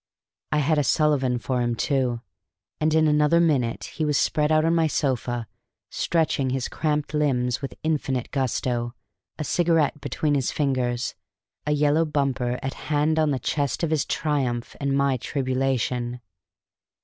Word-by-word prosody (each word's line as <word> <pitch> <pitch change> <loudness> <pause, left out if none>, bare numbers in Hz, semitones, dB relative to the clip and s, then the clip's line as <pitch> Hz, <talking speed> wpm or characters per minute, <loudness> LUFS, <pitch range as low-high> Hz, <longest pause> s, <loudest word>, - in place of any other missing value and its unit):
I 150 - +2
had 150 +1 +2
a - - +2
Sullivan 135 -2 +2
for 125 +1 -1
him, 120 -1 0
too; 125 -3 0 0.6
and 155 0 +2
in 160 0 +4
another 150 +2 +4
minute 135 -9 +1
he 160 - -4
was 150 -2 +2
spread 150 0 +1
out 155 0 +4
on 165 - +3
my 165 -1 +3
sofa, 125 -5 -1 0.5
stretching 155 -5 0
his 130 0 -1
cramped 150 -1 -1
limbs 125 -5 +1
with 135 - -5
infinite 140 -6 -1
gusto, 125 -2 -1 0.4
a 155 - -3
cigarette 160 -3 +1
between 150 -2 -1
his 135 -4 +1
fingers, 125 -4 -1 0.5
a - - +2
yellow 150 +2 +3
bumper 135 -5 -1
at 130 - -2 0.2
hand 155 +1 +2
on 155 -1 +3
the 140 - +1
chest 140 +3 -1
of 165 - 0
his 155 -3 +2
triumph 130 -6 -1
and 140 -1 0
my 140 -1 +2
tribulation. 130 -2 -1
140 Hz, 155 wpm, -24 LUFS, 125-150 Hz, 0.6 s, in